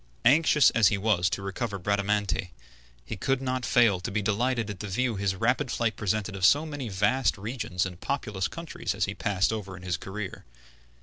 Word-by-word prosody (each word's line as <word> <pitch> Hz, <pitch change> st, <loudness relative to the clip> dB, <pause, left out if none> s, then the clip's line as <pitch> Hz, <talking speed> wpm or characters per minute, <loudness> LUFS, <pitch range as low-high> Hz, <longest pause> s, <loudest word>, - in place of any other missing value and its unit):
Anxious 150 Hz, +2 st, +5 dB
as 115 Hz, -3 st, +4 dB
he 105 Hz, -, +2 dB
was 95 Hz, -4 st, +2 dB
to 95 Hz, -, -3 dB
recover 100 Hz, +2 st, -3 dB
Bradamante, 100 Hz, -3 st, 0 dB, 0.6 s
he -, -, -5 dB
could 135 Hz, +7 st, 0 dB
not 130 Hz, -1 st, -2 dB
fail 115 Hz, -6 st, +4 dB
to 90 Hz, -, -4 dB
be 105 Hz, +1 st, -1 dB
delighted 115 Hz, +3 st, 0 dB
at 95 Hz, -, -9 dB
the 105 Hz, -, -5 dB
view 120 Hz, +4 st, 0 dB
his 100 Hz, -1 st, -1 dB
rapid 125 Hz, +7 st, +1 dB
flight 115 Hz, -2 st, 0 dB
presented 105 Hz, 0 st, -2 dB
of 95 Hz, -, -6 dB
so 145 Hz, +10 st, +5 dB
many 145 Hz, -6 st, -5 dB
vast 125 Hz, +7 st, +1 dB
regions 105 Hz, -4 st, -2 dB
and 90 Hz, -2 st, -8 dB
populous 105 Hz, -9 st, -2 dB
countries 165 Hz, -, -5 dB
as -, -, +1 dB
he -, -, -4 dB
passed 100 Hz, +1 st, 0 dB
over 95 Hz, -4 st, -5 dB
in 90 Hz, -, -12 dB
his 90 Hz, -2 st, -1 dB
career. 100 Hz, 0 st, -6 dB
105 Hz, 195 wpm, -27 LUFS, 95-125 Hz, 0.6 s, Anxious